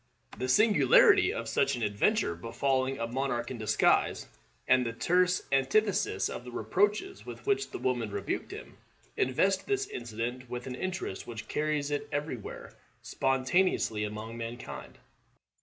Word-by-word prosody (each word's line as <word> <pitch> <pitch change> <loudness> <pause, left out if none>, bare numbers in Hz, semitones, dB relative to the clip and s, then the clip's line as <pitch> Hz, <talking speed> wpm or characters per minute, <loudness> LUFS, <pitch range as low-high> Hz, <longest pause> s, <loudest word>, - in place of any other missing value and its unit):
The 130 +4 -3
singularity 195 - +5
of - - -4
such - - +1
an 120 - -4
adventure 105 - +1
befalling 130 +8 -1
a 115 - -2
monarch 120 0 -2
in 125 - -6
disguise, 110 0 +2 0.4
and 125 - +5
the 115 -1 -3
terse 180 +7 +2
antithesis 190 +10 +2
of - - -6
the 125 - -9
reproaches 205 - 0
with - - -10
which 410 0 +1
the - - -6
woman 120 -4 -1
rebuked - - -3
him, - - -10 0.4
invest 190 +10 +1
this 405 0 0
incident 125 - -5
with 125 0 -5
an 130 - -5
interest 185 - -4
which 115 -2 -7
carries 150 -1 -1
it 145 - -2
every 145 -1 -2
where 110 - -9 0.3
spontaneously 135 - +1
among 105 +2 -5
mankind. 115 +1 -7
130 Hz, 145 wpm, -30 LUFS, 115-180 Hz, 0.4 s, singularity